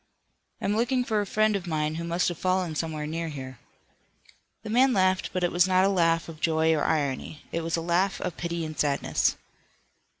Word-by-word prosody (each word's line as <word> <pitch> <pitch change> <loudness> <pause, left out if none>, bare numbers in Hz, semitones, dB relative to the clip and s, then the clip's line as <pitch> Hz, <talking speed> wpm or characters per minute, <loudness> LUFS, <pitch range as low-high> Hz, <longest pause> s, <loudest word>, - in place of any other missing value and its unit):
"I'm 205 - 0
looking 250 +3 +1
for 220 -3 0
a 205 - -4
friend 215 +1 +2
of 190 -2 -4
mine 155 -2 -1
who 165 +1 -4
must 170 +1 0
have 175 - -6
fallen 185 -2 0
somewhere 155 -1 -3
near 165 +2 -3
here." 130 -4 -8 1.0
The 215 - -5
man 255 +3 +4
laughed, 185 -2 +2
but 185 -1 -2
it 175 - +1
was 175 +1 +4
not 185 0 +4
a - - +3
laugh 165 -3 +2
of 160 -2 -10
joy 160 0 +3
or 155 - 0
irony. 150 0 -1
It 170 - -1
was 165 +1 -1
a - - -2
laugh 175 +4 +1
of 175 - -4
pity 170 -1 -3
and 155 0 -6
sadness. 145 -2 +1
170 Hz, 205 wpm, -27 LUFS, 160-190 Hz, 1.0 s, man